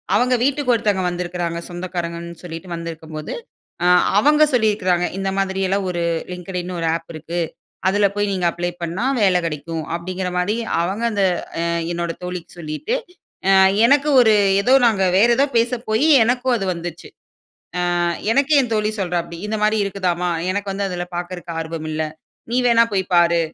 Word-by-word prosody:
அவங்க 250 +1 +3
வீட்டுக்கு 275 -1 +2
ஒருத்தவங்க 205 -4 +1
வந்திருக்கிறாங்க, 175 -1 -3
சொந்தக்காரங்கன்னு 170 -1 -5
சொல்லிட்டு 175 +1 -8
வந்திருக்கும்போது, 160 -2 -7 0.5
அ. - - +4 0.3
அவங்க 300 +6 +5
சொல்லியிருக்கிறாங்க. 205 -7 +2
இந்த 195 0 -1
மாதிரியெல்லாம் 195 0 0
ஒரு 175 -1 -2 0.3
Linkedin 180 0 -5
ன்னு 180 -1 -5
ஒரு 165 - 0
ஆப் 165 0 -7
இருக்கு. 165 +3 -4 0.5
அதில 200 +1 +3
போய் 205 -1 0
நீங்க 180 -2 0
அப்ளை 175 +1 -3
பண்ணா 175 +8 -2 0.2
வேல 190 -3 +4
கெடைக்கும். 160 +1 -5
அப்பிடிங்கிறமாரி 180 +3 -2 0.2
அவங்க 195 +7 -2
அந்த, 200 -2 +2 0.4
அ - - 0 0.3
என்னோட 170 0 -2
தோழிக்கு 180 -1 -7
சொல்லிட்டு, 160 - -3 0.9
எனக்கு 285 +4 +4
ஒரு 225 -3 +6 0.3
ஏதோ 250 +6 +3
நாங்க, 215 -5 +3
வேற 215 +4 +6
ஏதோ 275 - +4
பேச 230 +1 +3 0.2
போயி, 220 +7 +2 0.2
எனக்கும் 250 +2 +1
அது 195 - -3
வந்துச்சு. 170 -1 -7 0.9
ஆ - - +1 0.3
எனக்கே 285 +4 +3
என் 245 - -4
தோழி 215 0 +1
சொல்றாப்பிடி, 175 -2 -2
இந்தமாரி 215 0 +1
இருக்குதாம்மா! 180 -3 -1 0.2
எனக்கு 200 0 -3
வந்து 200 +1 -2
அதில 175 -1 -3
பாக்குறதுக்கு 175 -1 -5
ஆர்வம் 160 -1 -5
இல்ல. 155 +1 -1 0.5
நீ 245 - +2
வேணா 230 -1 +5
போய் 190 -1 +1
பாரு! 170 -1 +4
185 Hz, 155 wpm, -20 LUFS, 170-210 Hz, 0.9 s, ஒரு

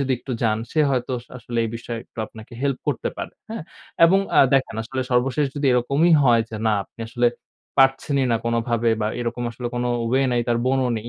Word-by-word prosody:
যদি 135 -1 +1
একটু 130 - -6
যান 110 -2 +2
সে 155 - +2
হয়তো 130 -1 -1
আস 120 - -13
আসলে 120 -1 -5
এই 115 - -2
বিষয়ে 120 0 -6
একটু - - -21
আপনাকে 110 +2 -13
help 140 -2 0
করতে - - -1
পারে, - - -5 0.2
হ্যাঁ? 225 -6 -4 0.4
এবং 185 +4 +5 0.2
আ - - +8
দেখেন 130 -4 +1
আসলে 130 +4 -4
সর্বশেষ 135 +4 +2
যদি 145 - 0
এরকমই 140 +7 +3
হয় 120 -4 +5
যে 110 - -5
না 110 - +3
আপনি 115 - -17
আসলে 120 +1 +1 0.5
পারছেনই 135 0 +3
না - - +3
কোনোভাবে 115 0 +1
বা 105 - +1
এরকম 120 0 -3
আসলে 120 +1 -6
কোনো 120 0 -1 0.2
way 135 +1 +3
নাই, 120 - +2
তার 120 0 +2
বোনও 130 -1 +2
নেই, 110 +2 -8
125 Hz, 210 wpm, -23 LUFS, 115-135 Hz, 0.5 s, আ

